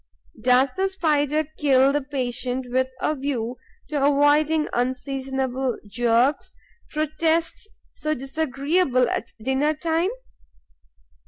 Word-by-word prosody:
Does 255 +2 +4
the 385 +1 0
Spider 310 -5 +1
kill 270 -2 +4
the 290 - +1
patient 255 -2 -3
with 260 +1 +2
a 305 - +1
view 255 -4 -3 0.3
to 290 -2 -1
avoiding 290 +2 +3
unseasonable 260 0 -2
jerks, 240 +5 +1 0.3
protests 320 +5 -1 0.2
so 310 0 -2
disagreeable 275 0 0
at - - -3
dinner 265 +6 +1
time? 330 +3 0
275 Hz, 100 wpm, -23 LUFS, 255-310 Hz, 0.3 s, Does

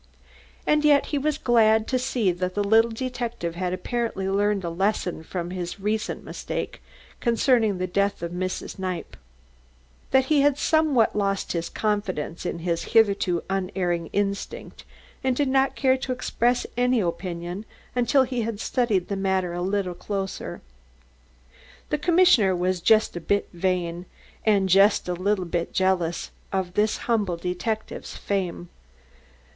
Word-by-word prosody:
And 300 0 +3
yet 290 -2 +5
he 290 - +2
was 300 +1 0
glad 220 -4 +3
to 255 - +1
see 245 -6 +1
that 180 +1 -3
the 205 - +1
little 225 +3 +4
detective 235 -7 -4
had 180 +1 -2
apparently 225 0 -2
learned 200 0 +1
a 170 - -2
lesson 185 -1 -1
from 175 +1 -4
his 180 0 -5
recent 215 +2 -2
mistake - - -5 0.4
concerning 230 -3 +2
the 185 - -1
death 200 0 0
of 170 - -3
Mrs. 185 +1 -4
Kniepp 185 -2 -4 0.9
that 265 0 +4
he 290 +1 +3
had 285 -1 +3
somewhat 305 -8 +3
lost 195 -1 0 0.2
confidence 185 -6 -2
in - - -3
his 170 -2 0
hitherto 200 -5 +3
unerring 180 -3 -1
instinct, 200 0 -3 0.4
and 260 -1 +1
did 285 +1 +1
not 270 +1 +2
care 260 -1 +3
to 260 - -4
express 245 -1 0
any 250 0 +2
opinion 175 +1 -3 0.3
until 250 +2 +4
he 250 -1 -2
had 220 -2 -3
studied 220 -7 0
the 200 - -2
matter 190 -2 0
a 175 - -3
little 190 0 -1
closer. 195 +2 -5 1.3
The 300 - +1
commissioner 330 - +4
was 180 0 0
just 215 +4 +4
a - - -3
little 165 - -19
bit 200 0 +1
vain, 175 -1 -1 0.4
and 200 -3 +4
just 195 +2 +4
a 180 - 0
little 185 +1 0
bit 170 0 -2
jealous 185 -3 0 0.2
of 190 -2 -2
this 210 +2 +1
humble 205 -7 +1
detective's 185 +6 -4
fame. 180 -3 -3
200 Hz, 150 wpm, -25 LUFS, 180-240 Hz, 1.3 s, yet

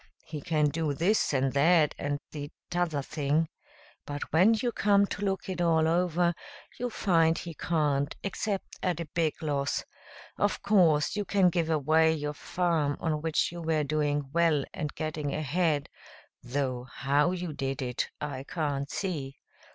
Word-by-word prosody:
He 155 -2 -6
can 150 -1 +2
do 155 -1 -1
this 185 +9 +2
and 135 -1 +1
that 155 +2 +4
and 145 0 -1
the 145 -1 -6 0.2
t'other 170 -5 0
thing.' 150 +2 0 0.6
But 145 0 -5
when 190 +8 +6
you 240 +2 -1
come 200 -2 +3
to 205 - -5
look 195 -1 -1
it 185 -2 -3
all 160 -2 +3
over, 175 0 +2 0.5
you 245 0 -1
find 165 -7 +2
he 170 - -6
can't, 150 -3 0
except 200 0 -3
at 180 -3 0
a 170 - -3
big 160 -3 +1
loss. 145 -2 -1 0.6
Of - - 0
course, 175 -6 +4
you 205 - 0
can 195 -2 +3
give 165 -2 0
away 160 +1 +3
your 150 -1 -3
farm 160 -3 0
on 155 -2 -1
which 160 0 +1
you 175 0 -7
were 160 -2 +1
doing 145 -1 -1
well 165 -4 +3
and 150 -4 -3
getting 155 -2 -3
ahead, 155 0 0 0.5
though 130 -1 -2
how 145 +4 +2
you 180 -3 -4
did 135 -1 -3
it, 125 -1 -2
I 140 -3 -4
can't 145 -4 -2
see. 145 -9 -3
155 Hz, 160 wpm, -29 LUFS, 145-175 Hz, 0.6 s, when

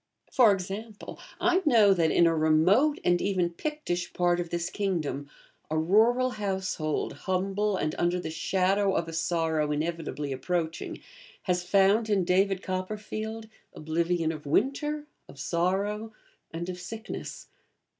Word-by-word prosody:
For 240 -5 +6
example, 200 +3 -5 0.2
I 360 +1 +3
know 225 - +6
that, 165 -3 +2
in 170 - +4
a 165 -1 +3
remote 170 - +4
and 175 0 +2
even 185 -3 0
Pictish 180 - -3
part 175 0 +2
of 175 -1 -3
this 170 +1 -2
kingdom, 165 -8 -2 0.4
a 155 - -1
rural 225 +10 +3
household, 190 -7 -2
humble 195 +2 -1
and 155 -3 -1
under 175 +1 +1
the 170 - -5
shadow 190 +4 +1
of 165 - 0
a 165 - -7
sorrow 160 -2 0
inevitably 150 -2 -3
approaching, 165 +4 -3 0.4
has 180 -1 0
found 200 +4 +3
in 200 -3 +2
'David 190 +1 +2
Copperfield' 215 +4 -4 0.3
oblivion 165 +1 0
of 150 -2 -8
winter, 295 - 0 0.2
of 140 - -13
sorrow, 195 +8 -1 0.4
and 170 +1 -5
of 180 -1 -5
sickness. 220 +4 -7
185 Hz, 135 wpm, -28 LUFS, 165-210 Hz, 0.4 s, For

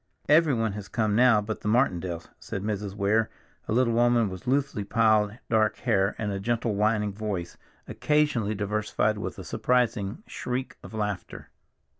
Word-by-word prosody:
"Everyone 140 -9 +3
has 105 -1 -7
come 110 -3 0
now 120 -2 +5
but 110 +1 -5
the 105 - -2
Martindales," 90 -8 0
said 100 - -5
Mrs. 105 -2 -3
Weir, 105 +2 +2 0.4
a - - -3
little 120 +1 +3
woman 120 -2 +3
with 95 +7 -9
loosely 135 -5 0
piled 110 0 +2
dark 110 -2 +2
hair, 100 -5 +1
and 105 -2 -2
a 100 - -3
gentle, 115 +1 -1
winning 105 0 +1
voice, 100 -5 -4 0.3
occasionally 145 -8 +1
diversified 105 +1 0
with - - -5
a 95 - -7
surprising 115 - 0
shriek 125 - -4
of - - -10
laughter. 105 -3 -4
110 Hz, 155 wpm, -27 LUFS, 100-120 Hz, 0.4 s, now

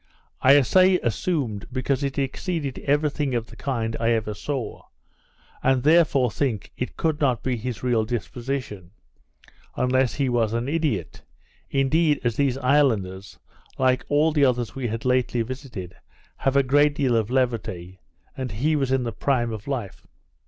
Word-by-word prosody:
I 140 +2 +7
say 185 +7 +4
assumed, 120 - -2
because 130 +2 -1
it 140 -1 -2
exceeded 140 +1 -2
every 145 +1 +2
thing 140 -3 -2
of 115 -1 -1
the - - -14
kind 115 -5 -2
I 115 0 +1
ever 110 -2 -1
saw; 130 +3 -5 0.8
and 130 -1 +2
therefore 150 -6 +4
think 115 -7 -2
it 125 - -5
could 160 -2 -1
not 125 -5 +1
be 130 -1 0
his 120 -1 -5
real 120 -3 +2
disposition, 120 -4 -4 0.9
unless 125 -1 +1
he 140 -2 0
was 115 -3 +1
an 115 +2 -1
idiot 150 - -2 0.5
indeed, 150 +3 +2
as 120 -2 0
these 135 -3 +1
islanders, 115 -9 +1 0.4
like 130 -1 +2
all 150 +2 +3
the 150 -2 +2
others 125 -3 +1
we 130 -2 -3
had 115 +1 -4
lately 125 -2 +1
visited, 120 - -7 0.4
have 135 0 0
a 140 - +5
great 145 +2 +3
deal 130 -5 +1
of 110 -1 +1
levity, 100 -8 -2 0.4
and 130 -4 -4
he 150 +9 +1
was 135 -3 0
in 130 -1 +2
the 115 - -2
prime 120 +1 0
of 110 +2 -8
life. 120 -8 -5
130 Hz, 160 wpm, -24 LUFS, 115-140 Hz, 0.9 s, I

